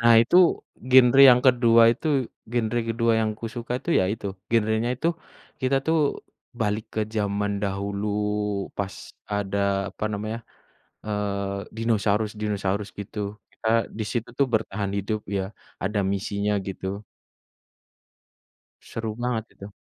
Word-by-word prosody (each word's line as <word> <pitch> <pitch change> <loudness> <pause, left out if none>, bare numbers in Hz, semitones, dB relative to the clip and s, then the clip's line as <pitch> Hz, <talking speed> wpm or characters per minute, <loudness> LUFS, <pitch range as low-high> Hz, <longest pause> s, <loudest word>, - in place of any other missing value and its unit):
Nah, 115 0 +6
itu 145 - +2 0.5
genre 130 +1 +7
yang 125 0 +5
kedua 120 -2 +6
itu 160 - -7 0.5
genre 120 0 0
kedua 115 0 +2
yang 110 -1 +1
aku 115 - -5
suka 120 +1 -5
itu, 170 - -4
ya - - +2
itu. 105 - -5 0.2
Genrenya 110 +1 +2
itu 165 - 0 0.5
kita 130 +1 +2
tuh 160 0 +3 0.6
balik 105 +1 0
ke 110 - 0
zaman 100 -1 0
dahulu 100 +1 -2 0.7
pas 100 -1 -2 0.4
ada 100 -1 -1 0.3
apa - - -5
namanya, 110 +2 -3 0.7
eee, 100 -1 -3
dinosaurus-dinosaurus 105 -2 0
gitu. 100 +1 -6 0.3
Kita 110 - -6 0.3
di 110 - -1
situ 120 -1 -2
tuh 140 -1 +3
bertahan 105 -2 -1
hidup 105 +2 -1
ya, 100 -1 -1 0.4
ada 105 +2 0
misinya 100 +1 -1
gitu. 95 +2 -5 1.8
Seru 115 -1 -5
banget 120 -3 -1
itu. 100 +1 -10
110 Hz, 125 wpm, -25 LUFS, 100-115 Hz, 1.8 s, genre